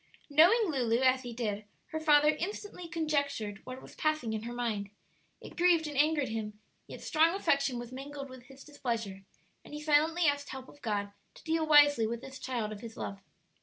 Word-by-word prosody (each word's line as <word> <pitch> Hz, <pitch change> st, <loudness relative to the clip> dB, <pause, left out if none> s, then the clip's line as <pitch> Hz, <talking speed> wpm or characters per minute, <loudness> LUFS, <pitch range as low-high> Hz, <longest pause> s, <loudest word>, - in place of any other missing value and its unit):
Knowing 345 Hz, +11 st, +6 dB
Lulu 245 Hz, -3 st, +1 dB
as 260 Hz, 0 st, +4 dB
he 245 Hz, -2 st, -7 dB
did, 215 Hz, -3 st, -3 dB, 0.3 s
her 315 Hz, -, -3 dB
father 300 Hz, -1 st, +5 dB
instantly 360 Hz, +3 st, -4 dB
conjectured 285 Hz, -11 st, -2 dB
what 255 Hz, +1 st, -8 dB
was -, -, -13 dB
passing 310 Hz, -8 st, -1 dB
in 215 Hz, -, -2 dB
her 235 Hz, +2 st, -6 dB
mind. 225 Hz, -5 st, -2 dB, 0.5 s
It -, -, -11 dB
grieved 345 Hz, -2 st, +4 dB
and 295 Hz, -1 st, -5 dB
angered 295 Hz, -1 st, +2 dB
him, 215 Hz, -1 st, -5 dB, 0.3 s
yet -, -, -9 dB
strong 330 Hz, +2 st, +3 dB
affection 280 Hz, -9 st, +1 dB
was 240 Hz, 0 st, -7 dB
mingled 275 Hz, +2 st, -7 dB
with 255 Hz, -2 st, -12 dB
his 270 Hz, +1 st, -14 dB
displeasure, 230 Hz, -9 st, -4 dB, 0.4 s
and -, -, -10 dB
he -, -, -5 dB
silently 310 Hz, +3 st, +3 dB
asked 285 Hz, -1 st, +1 dB
help 265 Hz, 0 st, -7 dB
of 290 Hz, -, -17 dB
God 205 Hz, -3 st, -2 dB, 0.2 s
to -, -, -15 dB
deal 320 Hz, -1 st, 0 dB
wisely 290 Hz, -6 st, +6 dB
with 235 Hz, +1 st, -4 dB
this 270 Hz, 0 st, -9 dB
child 235 Hz, -5 st, -3 dB
of 210 Hz, -1 st, -8 dB
his 230 Hz, -1 st, -9 dB
love. 195 Hz, -, -5 dB
270 Hz, 195 wpm, -31 LUFS, 230-310 Hz, 0.5 s, Knowing